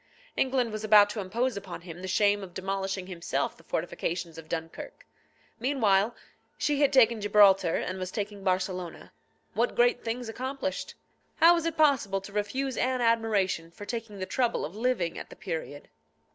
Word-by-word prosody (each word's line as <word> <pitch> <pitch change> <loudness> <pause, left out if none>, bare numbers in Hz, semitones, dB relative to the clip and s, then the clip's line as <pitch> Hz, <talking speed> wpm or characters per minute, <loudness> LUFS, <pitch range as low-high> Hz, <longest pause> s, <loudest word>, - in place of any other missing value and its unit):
England 255 -3 +1
was 215 0 -5
about 210 -1 +6
to 215 - -5
impose 230 +6 -1
upon 190 -3 -7
him 170 0 -9
the 185 - -5
shame 205 +2 +3
of 185 -3 -10
demolishing 195 0 -3
himself 180 -3 -2
the - - -20
fortifications 170 -1 -3
of 160 -1 -13
Dunkirk. 165 -1 -6 0.5
Meanwhile, 225 -5 +2 0.4
she 295 -1 0
had 285 -1 +4
taken 235 -5 +5
Gibraltar, 200 -4 +5
and 185 +1 -3
was 185 -1 -3
taking 205 -1 -5
Barcelona. 185 -2 -2 0.4
What - - 0
great 485 -2 +3
things 235 +1 -3
accomplished! 265 +5 -4 0.4
How 335 +2 +7
was 335 -1 0
it 330 - -3
possible 265 -11 +3
to 200 +1 -11
refuse 255 +6 -2
Anne 255 0 0
admiration 215 -7 +1
for 205 +5 -10
taking 225 -2 -5
the 190 - -3
trouble 240 +4 0
of 165 - -8
living 220 -7 -1
at - - -9
the - - -11
period? 145 -3 -6
205 Hz, 170 wpm, -28 LUFS, 185-250 Hz, 0.5 s, How